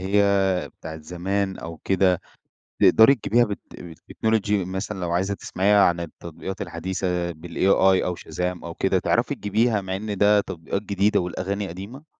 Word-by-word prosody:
هي 95 -1 +2
بتاعة 80 -1 -9
زمان 95 +4 -2
أو 85 0 -7
كده، 95 -2 +2 0.6
تقدري 110 +5 +7
تجيبيها 120 -1 +2
بال 105 -2 -4 0.4
بالTechnology 110 +4 -1
مثلًا 95 0 -2
لو 85 -1 -2
عايزة 95 +3 0
تسمعيها 100 +1 +2
عن 85 0 +2
التطبيقات 85 +3 -7
الحديثة 90 +1 -2
بالAi 95 +3 +2
أو 90 -1 -2
Shazam 90 +3 -4
أو 85 -1 -6
كده، - - +1
تعرفي - - +1
تجيبيها 110 +2 +1
مع 95 -1 -4
إن 105 0 -4
ده 105 +1 +5
تطبيقات 90 +2 -4
جديدة 100 0 +1
والأغاني 95 +3 -3
قديمة؟ 100 - -9
95 Hz, 150 wpm, -24 LUFS, 90-100 Hz, 0.6 s, تقدري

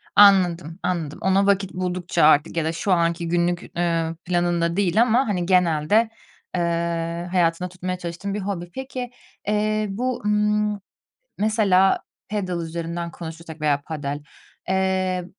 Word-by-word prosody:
Anladım 180 -4 +5
anladım, 165 -5 -2
ona 190 +2 +3
vakit 195 -1 +1
buldukça 180 -1 -1
artık 150 +3 +4
ya 160 - +1
da 160 - 0
şu 190 +4 -2
anki 170 0 +1
günlük, 175 +1 0
eee, 165 -1 0
planında 175 -1 +1
değil 200 +2 +3
ama 240 +2 +3
hani 180 -4 -1
genelde, 180 +4 +3 0.5
eee, 170 0 -1
hayatında 175 0 +1
tutmaya 185 0 -4
çalıştığın 175 +3 -5
bir 210 - -2
hobi. 185 -3 -4
Peki, 260 -2 -5 0.4
eee, 215 0 +1
bu, 245 +5 -2
ımm, 210 0 +1 0.6
mesela 205 -3 +3 0.3
padel 185 -5 -2
üzerinden 170 +1 -4
konuşursak 165 -1 -9
veya 145 -2 +2
padel, 145 -2 -4 0.5
eee, 190 -1 0
180 Hz, 135 wpm, -23 LUFS, 170-200 Hz, 0.6 s, Anladım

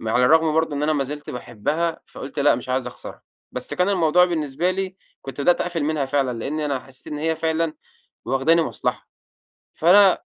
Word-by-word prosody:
ما 110 0 -3
على 125 0 +4
الرغم 160 +2 +4
برضو 160 -1 +1
إن 145 - -2
أنا 155 +1 +2
ما 140 -2 0
زلت 145 +2 -7
باحبّها 135 +8 -2
فقلت 135 - -9
لا 145 -2 +4
مش 125 +2 -6
عايز 130 0 -1
أخسرها. - - -9 0.3
بس - - -4
كان 180 +1 +1
الموضوع 180 -2 +4
بالنسبة 160 0 -1
لي 190 0 -3 0.3
كنت 135 +1 -7
بدأت 175 +5 +3
أقفل 170 -4 -1
منها 150 -2 0
فعلًا، 135 -3 -1
لأني 150 +6 -3
أنا 140 -3 -1
حسّيت 135 +3 -11
إن 150 - -4
هي 160 +1 0
فعلًا 160 0 -1 0.5
واخداني 135 +7 +3
مصلحة. - - -3 0.7
فأنا 190 +3 +5
155 Hz, 190 wpm, -22 LUFS, 135-165 Hz, 0.7 s, فأنا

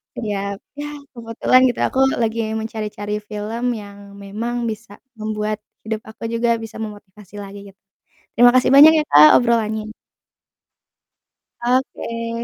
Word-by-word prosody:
Ya, 200 -3 -3 0.2
ya 295 - -4 0.2
kebetulan 235 +1 +1
gitu 245 - -2
aku 260 - -3 0.2
lagi 225 0 -1 0.2
mencari-cari 210 -1 -4
film, 210 +2 -6
yang 200 -1 -11
memang 225 +5 -5
bisa 220 -2 -6 0.2
membuat 215 0 -3 0.2
hidup 220 0 -3
aku 220 - -12
juga 235 0 +1
bisa 220 0 -9
memotivasi 210 -2 -10
lagi 200 0 -10 0.2
gitu. - - -63 0.6
Terima 245 +1 +7
kasih 255 0 +3
banyak 305 +3 +10
ya - - -2
Kak 150 +7 +7
obrolannya. 220 -2 -1 1.7
Oke, 230 -2 -2
220 Hz, 125 wpm, -20 LUFS, 210-235 Hz, 1.7 s, banyak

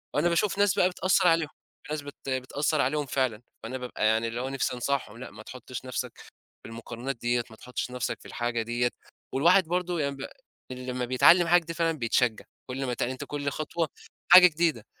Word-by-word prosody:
وأنا 155 +4 +3
باشوف 185 +4 +1
ناس 205 -1 +4
بقى 180 - +4
بتأثّر 185 0 +2
عليهم، 165 -2 +3 0.4
في - - -8
ناس 155 - -3
بت 145 0 -10
بتأثّر 140 +3 0
عليهم 145 +3 0
فعلًا، 130 -4 -1 0.2
فأنا 125 +3 -4
بابقى 125 -3 -3
يعني 110 +1 +2
اللي 115 +1 -4
هو 130 - -3
نِفْسي 135 -1 -1
أنصحهم 125 -3 -2
لأ 125 - -9
ما 105 +1 -12
تحطش 125 +1 -8
نَفْسك، 125 -1 -4 0.5
في - - -9
المقارنات 120 +3 -6
ديّة 120 +1 0
ما 110 - -13
تحطش 125 +2 -5
نَفْسك 125 -1 -3
في - - -18
الحاجة 120 -1 -2
ديّة، 120 +2 0 0.4
والواحد 175 +8 +5
برضو 180 +1 -1
يعني 140 -3 -1
ب 135 - -6 0.4
لمّا 125 0 -4
بيتعلّم 165 +8 +5
حاجة 170 -1 +3
فعلًا 165 -1 0
بيتشجّع، 120 -2 +1 0.2
كلّ 135 +2 -3
ما 125 - -2
ات 120 - -4
يعني 130 - 0
أنت 130 - -7
كلّ 145 -1 -3
خطوة، 155 +2 -2 0.4
حاجة 180 +1 +11
جديدة، 160 -8 0
130 Hz, 200 wpm, -27 LUFS, 120-160 Hz, 0.5 s, حاجة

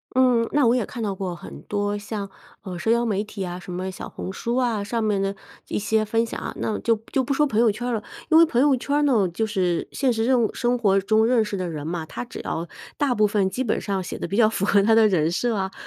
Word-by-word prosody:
嗯， 250 -3 +4
那 285 -4 +3
我 235 - +4
也 245 -4 0
看 240 - -7
到 205 -3 -2
过 185 -2 -4
很 170 - -10
多 205 0 -1
像， 205 -1 -5 0.3
呃， 185 -2 -6
社 195 +6 0
交 235 +1 +2
媒 205 -3 0
体 210 -1 -11
呀， 180 -1 -3
什 180 0 -9
么 185 +1 -3
小 185 - -7
红 185 - -6
书 235 +5 -2
啊， 235 -5 +1
上 230 +3 -2
面 210 -3 +1
的 195 0 -1 0.4
一 - - -1
些 220 +1 +1
分 225 +2 +1
享 230 - -6
啊。 - - -5
那 215 - -1
就 230 -1 +2 0.2
就 265 - +2
不 275 - -1
说 295 +2 +2
朋 215 - -3
友 230 -2 +4
圈 230 +4 -5
儿 245 - -1
了， 215 -2 -2 0.3
因 320 - +6
为 335 - +8
朋 245 -6 0
友 285 -1 +4
圈 270 +3 -3
儿 - - +2
呢， 245 -9 +3
就 195 +6 -1
是 185 -5 -1
现 270 -2 +1
实 225 -1 0
任 250 -1 +3
务 220 - -1
生 245 0 0
活 200 -4 +3
中 215 +3 +3
认 230 -2 +3
识 210 - -4
的 185 -2 -3
人 150 -2 -5
嘛， 165 -1 -3
他 120 -5 -6
只 - - -8
要 165 +1 -3 0.3
大 280 -4 +1
部 215 - +4
分 200 -2 +1
基 250 +8 -2
本 225 - 0
上 195 -2 -2
写 - - -6
得 - - -3
比 200 - -3
较 215 -1 +5
符 200 -3 -1
合 200 -1 +4
他 225 +2 +4
的 220 -1 +6
人 165 -5 +2
设 235 +6 0
啊， 190 -1 -2
215 Hz, 305 characters per minute, -23 LUFS, 195-240 Hz, 0.4 s, 为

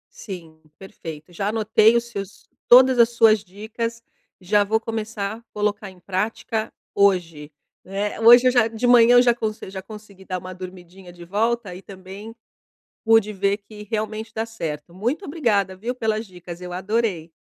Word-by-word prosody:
Sim, 165 -6 -10 0.2
perfeito. 165 -4 -10
Já 195 +4 -2
anotei 220 +1 +3
os 235 - +1
seus 200 -4 -8 0.2
todas 255 +1 +7
as 235 0 +6
suas 225 -3 +4
dicas, 220 +4 -6 0.4
e - - -19
já 205 +1 +4
vou 220 +2 0
começar 220 -1 -4
colocar 210 -1 -2
em 185 -1 -19
prática 215 +4 -3 0.2
hoje! 170 -7 +1 0.3
Eh, 200 +3 -4
hoje 240 +2 +8
eu - - +5
já 240 -3 +3
de 225 +2 -3
manhã 245 0 +6
eu 245 - +8
já 240 -1 +3
conse 215 -4 -5
já 190 0 -6
consegui 200 -2 -13
dar 185 -1 -4
uma 185 +1 -9
dormidinha 180 0 -11
de 175 0 -12
volta 215 +1 -1
e 185 - -9
também 195 +3 -11 0.7
pude 225 -2 +4
ver 200 0 0
que 210 0 -12
realmente 220 +1 -4
dá 225 +1 -2
certo! 165 -7 -6
Muito 245 - -2
obrigada 210 - 0
viu, 235 +6 -4
pelas 220 -2 -2
dicas, 180 -2 -10
eu 180 0 -7
adorei! 190 -3 -2
210 Hz, 170 wpm, -22 LUFS, 185-225 Hz, 0.7 s, hoje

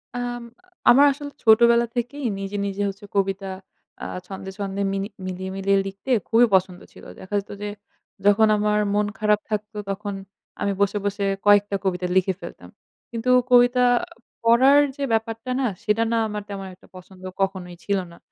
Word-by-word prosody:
আম 245 -1 -4 0.5
আমার 275 +4 +7
আসলে 285 0 -8
ছোটবেলা 235 +1 +6
থেকেই 255 +4 -3
নিজে 195 +1 -4
নিজে 200 0 -3
হচ্ছে 200 +1 -10
কবিতা 195 0 0 0.6
আ - - -3 0.2
ছন্দে-ছন্দে 195 +1 -5
মিনি 195 0 -2 0.2
মিলিয়ে 185 0 -5
মিলিয়ে 195 0 +2
লিখতে 195 +6 -8 0.2
খুবই 230 +2 +6
পছন্দ 185 -1 0
ছিল। - - -15 0.2
দেখা 190 +2 -11
যেত 200 - -10
যে 205 - -3 0.6
যখন 215 +2 +5
আমার 210 0 +1
মন 210 0 +2
খারাপ 210 -1 +3
থাকতো 210 0 -4
তখন 200 +1 -4 0.5
আমি 200 - +1
বসে 200 +1 +2
বসে 200 0 -1 0.2
কয়েকটা 205 0 +4
কবিতা 180 -1 -1
লিখে 190 0 +3
ফেলতাম। - - -10 0.4
কিন্তু 230 +2 -3 0.2
কবিতা 245 0 +5 0.6
পড়ার 260 +5 +6 0.2
যে 280 - -4
ব্যাপারটা 225 +2 -2
না 265 - +1 0.2
সেটা 225 +1 +2
না 230 - +2
আমার 210 0 -4
তেমন 195 -1 -6
একটা - - -22
পছন্দ 185 0 -14 0.2
কখনোই 185 -2 -2
ছিল 200 -1 0
না। 170 - -15
205 Hz, 160 wpm, -23 LUFS, 195-230 Hz, 0.6 s, আমার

